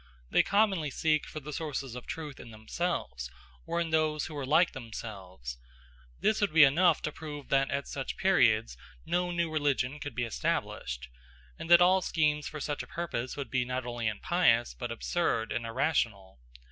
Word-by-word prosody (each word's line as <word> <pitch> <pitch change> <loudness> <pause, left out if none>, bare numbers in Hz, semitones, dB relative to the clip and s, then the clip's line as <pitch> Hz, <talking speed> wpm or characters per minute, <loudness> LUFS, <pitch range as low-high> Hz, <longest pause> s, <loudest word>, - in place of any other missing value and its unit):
They - - +6
commonly 200 -7 +2
seek 155 +2 +1
for 155 - -6
the 150 +2 -7
sources 140 -5 -4
of 125 0 -8
truth 150 -4 -6
in 115 - -10
themselves, 110 - -3 0.4
or 170 - -1
in 165 -1 -1
those 155 -1 +1
who 155 - -7
are 140 -3 -4
like 160 +5 +4
themselves. 95 - -8 0.6
This 215 0 +2
would 205 - +2
be 160 0 +8
enough 160 +4 +4
to 150 - -1
prove 150 -2 -8
that 135 0 +3
at 140 0 -2
such 135 -1 -4
periods 115 - +3 0.3
no 180 0 0
new 170 -2 -1
religion 145 -2 0
could 145 -5 -6
be 120 - 0
established, 65 - -2 0.5
and - - -6
that 175 0 +8
all 185 +1 +5
schemes 150 -3 +1
for 155 - -6
such 145 +1 -2
a - - -9
purpose 145 -8 -4
would 140 - -5
be 130 -1 +2
not 125 0 -3
only 120 -2 -2
impious 115 - +2
but - - -5
absurd 60 - -1
and 120 -1 -2
irrational. 115 - -1
145 Hz, 180 wpm, -30 LUFS, 115-160 Hz, 0.6 s, be